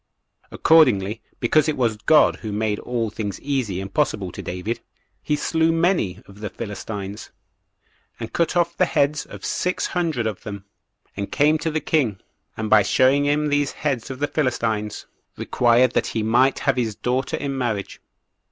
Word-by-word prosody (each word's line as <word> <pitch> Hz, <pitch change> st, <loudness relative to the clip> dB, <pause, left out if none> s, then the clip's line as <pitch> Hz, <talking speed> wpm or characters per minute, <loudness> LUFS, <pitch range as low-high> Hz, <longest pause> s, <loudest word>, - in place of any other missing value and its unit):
Accordingly, 115 Hz, -10 st, +4 dB, 0.2 s
because 155 Hz, +6 st, +3 dB
it 155 Hz, -, -1 dB
was 115 Hz, -4 st, +1 dB
God 150 Hz, +8 st, +4 dB
who 110 Hz, -, -6 dB
made 105 Hz, 0 st, -1 dB
all 115 Hz, -3 st, -2 dB
things 105 Hz, -2 st, -4 dB
easy 130 Hz, -10 st, -2 dB
and 95 Hz, 0 st, -7 dB
possible 110 Hz, -11 st, 0 dB
to -, -, -7 dB
David, 90 Hz, +7 st, -4 dB, 0.4 s
he 150 Hz, -, 0 dB
slew 160 Hz, +2 st, +1 dB
many 165 Hz, -, +1 dB
[of 100 Hz, +1 st, -15 dB
the 105 Hz, -1 st, -4 dB
Philistines], 100 Hz, 0 st, -6 dB, 0.9 s
and 115 Hz, -1 st, -6 dB
cut 170 Hz, 0 st, +1 dB
off 175 Hz, -1 st, +1 dB
the 185 Hz, -, +2 dB
heads 145 Hz, 0 st, +1 dB
of -, -, -9 dB
six 180 Hz, 0 st, -1 dB
hundred 165 Hz, -9 st, -1 dB
of 110 Hz, -3 st, -3 dB
them, 100 Hz, -2 st, -8 dB, 0.5 s
and 100 Hz, 0 st, -4 dB
came 150 Hz, +2 st, +3 dB
to 165 Hz, -, -1 dB
the 155 Hz, 0 st, -1 dB
king, 125 Hz, -, 0 dB, 0.4 s
and 110 Hz, -, -2 dB
by 110 Hz, 0 st, +6 dB
showing 130 Hz, +7 st, +3 dB
him 150 Hz, +1 st, +1 dB
these 145 Hz, -1 st, +1 dB
heads 135 Hz, -6 st, -2 dB
of 130 Hz, -, -5 dB
the 145 Hz, -, 0 dB
Philistines, 115 Hz, -8 st, -1 dB, 0.3 s
required 120 Hz, +1 st, +3 dB
that -, -, 0 dB
he 110 Hz, -, -2 dB
might 125 Hz, +5 st, +3 dB
have 135 Hz, -2 st, 0 dB
his 115 Hz, -4 st, -1 dB
daughter 125 Hz, +4 st, -1 dB
in 140 Hz, -1 st, -3 dB
marriage. 115 Hz, -6 st, -3 dB
120 Hz, 170 wpm, -22 LUFS, 105-145 Hz, 0.9 s, by